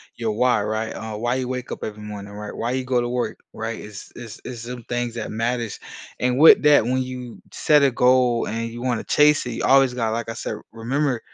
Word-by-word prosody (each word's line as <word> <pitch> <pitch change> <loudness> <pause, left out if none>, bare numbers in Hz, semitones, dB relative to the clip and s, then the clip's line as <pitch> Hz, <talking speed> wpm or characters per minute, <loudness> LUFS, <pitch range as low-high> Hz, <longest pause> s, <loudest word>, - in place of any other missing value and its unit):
your 115 -2 -2
why, 125 0 +2
right? 110 +1 -2
Uh, 110 -1 -6
why 120 +3 0
you 130 -1 -2
wake 125 0 -5
up - - -6
every 105 0 -6
morning, 105 -1 -8
right? 105 0 -7
Why 120 +1 -2
you 130 0 -1
go 125 -1 +1
to 120 - -2
work, 125 0 -2 0.2
right? 115 0 -4
It's 105 -2 -10
it's 115 -3 -9
it's 120 -3 -6
some 120 0 -7
things 120 0 -3
that 115 - -4
matters. 115 0 -2 0.4
And 125 0 +1
with 160 - +8
that, 150 -5 +6
when 130 +3 0
you 125 -2 -7
set 150 -1 +3
a 140 - +5
goal 125 -1 +3
and 115 +1 -3
you 120 +1 -8
wanna 125 -2 -1
chase 150 -1 +4
it, - - -3
you - - -4
always 135 -1 +5
gotta 115 -3 0
like 115 0 -3
I - - -3
said, - - -4 0.2
remember 125 +3 -1
120 Hz, 235 wpm, -22 LUFS, 115-125 Hz, 0.4 s, with